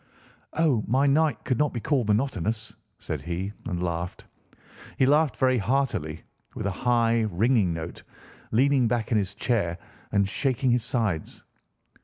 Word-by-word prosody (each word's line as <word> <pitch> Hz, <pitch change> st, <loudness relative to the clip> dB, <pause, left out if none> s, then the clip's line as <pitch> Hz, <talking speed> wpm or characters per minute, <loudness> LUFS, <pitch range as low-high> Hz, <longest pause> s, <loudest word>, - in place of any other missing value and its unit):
"Oh, 150 Hz, -9 st, +2 dB
my 130 Hz, +6 st, +3 dB
night 150 Hz, +2 st, +2 dB
could 130 Hz, -4 st, -1 dB
not 150 Hz, -1 st, +2 dB
be 120 Hz, -, -2 dB
called 125 Hz, -2 st, 0 dB
monotonous," 110 Hz, -1 st, -1 dB, 0.2 s
said 75 Hz, -, -5 dB
he, 90 Hz, +6 st, -4 dB
and 90 Hz, -1 st, -2 dB
laughed. 85 Hz, 0 st, -3 dB, 0.7 s
He 130 Hz, -, +4 dB
laughed 145 Hz, -4 st, +3 dB
very 130 Hz, 0 st, +3 dB
heartily, 100 Hz, -, -1 dB, 0.3 s
with -, -, -4 dB
a 100 Hz, -, 0 dB
high, 115 Hz, +1 st, +2 dB
ringing 105 Hz, 0 st, +2 dB
note, 80 Hz, -1 st, -6 dB, 0.5 s
leaning 130 Hz, +1 st, +3 dB
back 115 Hz, -1 st, -1 dB
in 110 Hz, -, +4 dB
his 100 Hz, 0 st, -3 dB
chair 100 Hz, -9 st, 0 dB, 0.3 s
and 100 Hz, -1 st, +2 dB
shaking 130 Hz, +4 st, 0 dB
his 120 Hz, -1 st, +2 dB
sides. 110 Hz, -, -2 dB
115 Hz, 150 wpm, -26 LUFS, 95-130 Hz, 0.7 s, He